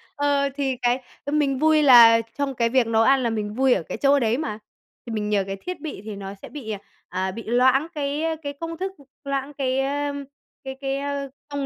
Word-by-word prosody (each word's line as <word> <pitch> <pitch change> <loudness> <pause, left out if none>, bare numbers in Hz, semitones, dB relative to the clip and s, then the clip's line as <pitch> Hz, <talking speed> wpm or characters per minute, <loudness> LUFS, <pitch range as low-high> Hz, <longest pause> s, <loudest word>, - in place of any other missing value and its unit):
ờ, 285 -1 +1
thì 275 -2 -1
cái, 245 +1 +1 0.2
ơ, 285 - -3
mình 290 -3 +1
vui 310 0 +4
là 235 -4 +8 0.2
trong 280 -2 -1
cái 235 -1 +1
việc 250 -1 +2
nấu 225 -1 +3
ăn 265 +1 +4
là 235 - +1
mình 210 -2 -3
vui 260 +1 +3
ở 185 - -1
cái - - -3
chỗ 280 0 +4
đấy 230 -1 +1
mà. 220 -8 -4 0.5
Thì 235 - -7
mình 210 -1 -2
nhờ 205 -2 +2
cái 195 - -3
thiết 365 0 -6
bị 305 -11 -6
thì 215 -1 -6
nó 195 0 -7
sẽ - - -9
bị, 260 -7 -7
à, 205 - -4 0.3
à, 185 +1 -2
bị 230 +4 -7
loãng 255 +5 +3
cái, 290 +1 -2
ơ, 325 0 0
cái 285 0 -4
công 330 0 -5
thức, 380 +3 -3
ừm, 280 - -19 0.2
loãng 275 0 -3
cái, 265 -1 -1
ơ, 285 +1 -1 0.5
cái 265 0 -6
cái, 270 0 -1
ơ, 280 -1 -3 0.2
công 285 -1 -3
270 Hz, 240 wpm, -23 LUFS, 230-285 Hz, 0.5 s, là